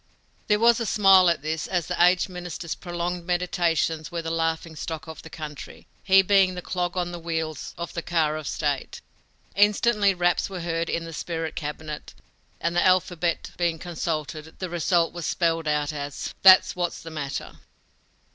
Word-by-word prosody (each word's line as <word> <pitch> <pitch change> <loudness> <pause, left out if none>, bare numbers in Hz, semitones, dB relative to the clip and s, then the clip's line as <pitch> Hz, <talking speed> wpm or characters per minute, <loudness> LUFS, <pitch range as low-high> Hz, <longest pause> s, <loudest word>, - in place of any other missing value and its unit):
There 210 - +4
was 235 +2 +4
a 230 - -1
smile 195 -3 +6
at 170 -4 -1
this, 155 +1 -2
as 175 -3 -1
the - - +1
aged 180 +1 +4
minister's 175 -2 -6
prolonged 175 0 -4
meditations 175 -3 0
were 170 -1 -3
the 165 - -3
laughing 165 0 -1
stock 155 -1 -5
of 160 - -9
the 160 - -11
country, 150 -3 -9 0.2
he 190 0 +5
being 190 -1 +4
the 180 - -6
clog 180 0 -2
on 175 -1 -1
the 175 - -6
wheels 160 -2 -4
of 170 0 -6
the 170 - -3
car 160 -3 0
of 155 -2 -5
state. 145 -3 -2 0.5
Instantly 205 0 +3
raps 175 +1 +1
were 185 -2 -6
heard 165 0 -2
in 165 0 -2
the 165 - -8
spirit 165 0 -4
cabinet, 150 0 -6 0.4
and, 170 +1 -1
the 175 - +3
alphabet 180 -2 +1
being 170 -2 0
consulted, 160 -2 -4
the 185 -2 -5
result 170 0 +1
was 175 -2 -4
spelled 165 -2 0
out 150 0 0
as: 145 -1 -5
"That's 190 -1 +7
what's 175 -1 -2
the 165 - -8
matter!" 145 -3 -5
170 Hz, 175 wpm, -25 LUFS, 160-180 Hz, 0.5 s, That's